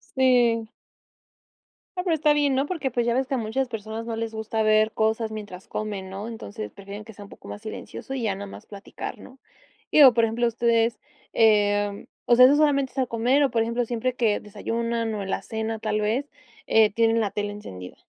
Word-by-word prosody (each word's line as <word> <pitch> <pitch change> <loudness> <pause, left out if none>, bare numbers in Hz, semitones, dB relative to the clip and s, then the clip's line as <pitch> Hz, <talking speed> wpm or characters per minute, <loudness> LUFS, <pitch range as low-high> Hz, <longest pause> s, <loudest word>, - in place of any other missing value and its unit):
Sí. 240 -4 +3 1.3
Ah, 360 - -1
pero 340 -3 +2
está 300 -1 +3
bien, 290 -2 +2
¿no? 270 +2 +1
Porque, 295 -7 -2
pues, 240 0 -1
ya 235 - +2
ves 260 0 +1
que 275 - -2
a - - +1
muchas 235 +4 -1
personas 220 0 -6
no 230 - -3
les 225 0 -3
gusta 220 0 -2
ver 215 0 +3
cosas 220 0 0
mientras 205 -4 -8
comen, 205 -3 -4
¿no? 200 +4 -6
Entonces 220 -1 -7
prefieren 200 +1 -9
que 220 - -11
sea 205 0 -11
un - - -13
poco - - -13
más 210 - -8
silencioso 225 +4 -7
y 260 - -3
ya 205 -3 0
no 200 +1 -7
más - - -11
platicar, 200 -1 -8
¿no? 265 +1 -14 0.5
Digo, 275 -5 +8
por 230 0 +4
ejemplo, 230 +2 0
ustedes, 230 0 +1 0.3
em, 205 -2 +2 0.2
o 240 - +5
sea, 250 0 +9
¿eso 285 +2 +5
solamente 280 -3 +2
es 270 - -10
al 255 - +1
comer 245 +5 +2
o, 275 - +3
por 225 -1 +1
ejemplo, 235 +1 -1
siempre 245 +2 -2
que 230 -4 +1
desayunan, 230 +2 -3
o, 205 - -3
en 190 - -5
la 195 - -2
cena 220 +2 -4
tal 215 -1 -1
vez, 240 +7 -1 0.4
eh, 220 -1 +5
tienen 225 +1 +2
la 210 - 0
tele 205 +1 -3
encendida? 90 - -9
225 Hz, 215 wpm, -25 LUFS, 210-245 Hz, 1.3 s, sea